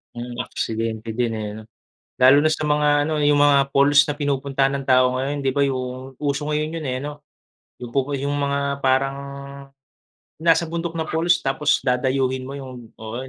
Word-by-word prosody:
Mm, 120 0 -7
aksidente 115 0 -4
din 115 0 -1
eh, 110 -1 -4
no? - - -8 0.6
Lalo 135 +3 +6
na 155 - +3
sa 155 -1 -1
mga 150 0 +2
ano, 155 -1 -1
yung 145 0 +4
mga 140 -1 +4
falls 145 +1 +5
na - - -1
pinupuntahan 140 -1 0
ng 140 - -3
tao 130 0 +4
ngayon, 140 +3 -2
di 135 -1 -1
ba? 140 - +2
Yung 130 -1 -3
uso 145 +1 -2
ngayon 155 +2 -1
yun 165 - -4
eh, 130 -3 -2
ano? 145 +1 -7 0.6
Yung 120 - -8
pupu 140 +1 0
yung 140 +1 -2
mga 140 0 -1
parang, 135 +1 +1 1.2
yung 165 - -9
nasa 165 0 +3
bundok 170 0 -3
na 160 - -1
falls 170 +2 +2
tapos 135 +2 +1
dadayuhin 130 0 0
mo 140 - -7
yung 130 -4 -10
oo. 110 +1 -8
140 Hz, 185 wpm, -22 LUFS, 130-145 Hz, 1.2 s, Lalo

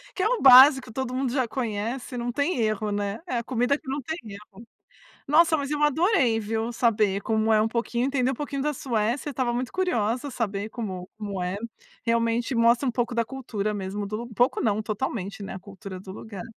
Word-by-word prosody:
que 370 - -1
é 425 - +3
o - - 0
básico, 265 -1 +8
todo 260 0 -3
mundo 260 -1 -1
já 260 -3 +1
conhece, 235 +2 -3
não 240 0 -2
tem 285 0 0
erro, 215 -1 0
né? 205 0 -2
É 245 -5 -1
a - - -5
comida 250 +3 +1
que 305 - -28
não 280 +2 -2
tem 315 +6 -4
erro. 210 +2 -12 0.6
Nossa! 320 +2 +5
Mas 285 -1 -3
eu 295 0 -1
adorei, 295 - +3
viu? 225 +2 -2
Saber 215 -4 +2
como 220 +1 +1
é 215 - +5
um 220 - +1
pouquinho 235 +2 -1
entender 265 -2 +1
um - - -3
pouquinho 280 0 -4
da 300 +1 0
Suécia, 240 +3 -1
tava 250 -2 -1
muito 250 +1 -3
curiosa 255 - 0
saber 210 -3 -3
como 190 -6 -5
como 205 -3 -5
é. 180 +2 -2 0.5
Realmente 230 +2 +1
mostra 235 +3 +4
um - - +2
pouco 240 0 -2
da 230 -1 +1
cultura 215 -5 -3
mesmo 200 0 -4
do 215 +3 -4
um 235 - -11
pouco 245 +4 +2
não, 215 -1 +1
totalmente, 215 -2 -4
né, 200 - -6
a 190 - -7
cultura 195 -1 -9
do 190 - -11
lugar. 200 -1 -8
235 Hz, 210 wpm, -25 LUFS, 210-265 Hz, 0.6 s, básico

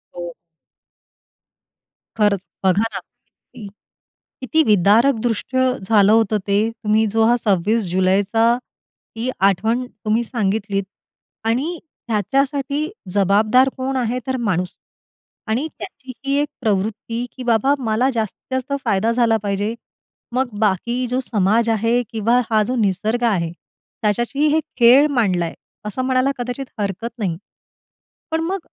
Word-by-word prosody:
हो. 175 -1 -6 1.8
खरंच 205 -3 +2 0.2
बघा 190 +2 +3
ना, - - -3 0.6
की 210 - -8 0.7
किती 315 +5 +2
विदारक 215 - +4
दृष्ट 235 +2 -2
झालं 220 -5 +3
होतं 220 -1 +3
ते. 205 +3 +2
तुम्ही 220 -1 +1
जो 225 0 +3
हा 240 +2 +4
26 210 +1 +1
जुलैचा 195 +4 +2 0.7
ही 235 +3 -2 0.2
आठवण 225 +7 0
तुम्ही 220 +1 -1
सांगितलीत 205 -3 -1 0.6
आणि 280 +10 -1 0.3
ह्याच्यासाठी 275 - 0 0.2
जबाबदार 210 +7 +4
कोण 265 +1 -2
आहे 245 0 -1
तर 260 0 -1
माणूस. 180 -2 0 0.8
आणि 240 +8 0
त्याची 265 -8 -9
ही 275 - 0
एक 295 - -1
प्रवृत्ती 220 +2 -1
की 255 - -6
बाबा 240 +3 +3
मला 240 +1 +1
जास्तीत 225 +3 -4
जास्त 260 +2 -3
फायदा 220 +1 +2
झाला 230 -2 +3
पाहिजे. 205 +2 -1 0.6
मग 255 -1 +1
बाकी 225 +5 0
जो 250 +2 -1
समाज 220 +1 +1
आहे 230 +2 +2
किंवा 230 +2 +2
हा 215 -1 +4
जो 255 - -1
निसर्ग 220 +2 0
आ, 230 -2 +3
हे 170 -1 -2 0.5
त्याच्याशी 240 +8 +1
हे 315 - +3 0.2
खेळ 250 +5 +7
मांडलाय. 185 -9 +1 0.3
असं 210 +5 -3
म्हणायला 260 +1 +2
कदाचित 245 +2 -4
हरकत 200 +3 -2
नाही. 180 -6 -1 0.9
पण 320 0 0
मग 370 +4 -2
225 Hz, 130 wpm, -20 LUFS, 205-255 Hz, 1.8 s, खेळ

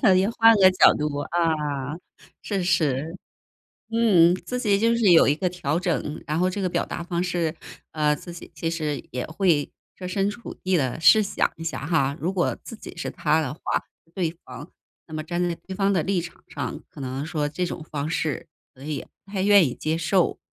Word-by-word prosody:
你 190 +2 +3
换 230 0 +5
个 190 -1 +7
角 185 - +6
度， 150 -1 -2
啊。 150 -4 -1 0.4
是 195 -4 -2
是， 160 -1 0 0.7
嗯， 195 -7 +5
自 250 +6 -5
己 205 -4 +2
就 230 +2 +3
是 220 -5 +4
有 165 - +7
一 145 - +3
个 180 +2 -1
调 170 -3 -2
整， 170 -4 -2
然 155 +2 -1
后 185 +1 +2
这 200 +2 -4
个 185 - 0
表 - - -1
达 170 - -5
方 175 0 -2
式， 170 -3 -1 0.4
呃， 150 -1 +1
自 175 +4 -10
己 170 - -11
其 165 +1 -2
实 155 -3 -3
也 125 - -3
会 160 -3 +1 0.3
设 180 - -6
身 195 +2 0
处 235 +3 -8
地 185 -1 +2
地 130 +1 -1
试 165 +8 +7
想 195 - 0
一 165 - -7
下 160 -3 -4
哈。 140 -4 +1
如 180 +4 -1
果 180 -2 0
自 230 - -8
己 215 - -11
是 170 - -4
他 155 +1 +1
的 135 -3 -3
话 155 - -17 0.5
对 175 -4 0
方， 130 +6 -9 0.4
那 160 - -11
么 155 0 -3
站 175 +2 -2
在 170 - -2
对 190 - -6
方 195 +1 +2
的 175 -5 +1
立 190 +1 0
场 170 +1 -11
上， 140 -3 -5
可 - - -13
能 130 +2 -4
说 155 -3 -1
这 180 +5 -2
种 170 - -5
方 145 +1 -2
式 160 -5 -2 0.3
可 130 - -18
能 150 - -7
也 150 - -3 0.2
不 195 - -16
太 190 -2 -1
愿 200 -4 +6
意 125 - -4
接 160 +1 -1
受。 175 +2 +1
170 Hz, 230 characters per minute, -24 LUFS, 150-185 Hz, 0.7 s, 个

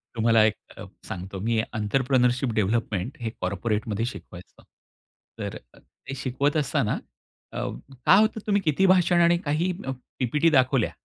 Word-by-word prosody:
तुम्हाला 115 -1 +4
एक 110 -1 +1 0.2
अ, - - -8 0.2
सांगतो 95 +1 -6
मी 115 +4 0
एंटरप्रेन्योरशिप 125 +4 +1
डेव्हलपमेंट 110 +1 -1
हे 115 - -2
कॉर्पोरेटमध्ये 105 +3 -1
शिकवायचो. 90 -7 -10 0.8
तर - - -4 0.2
अ, - - -20
ते 135 - -11
शिकवत 135 +3 -1
असताना 150 -3 0 0.6
अ, - - -7 0.5
काय 190 - +7
होतं 220 -1 0
तुम्ही 205 -1 +2
किती 165 +2 +2
भाषण 180 -2 +4
आणि 170 0 +4
काही 155 +5 0 0.5
पी-पी-टी 150 +6 +2
दाखवल्या 130 -4 +2
125 Hz, 135 wpm, -25 LUFS, 110-150 Hz, 0.8 s, काय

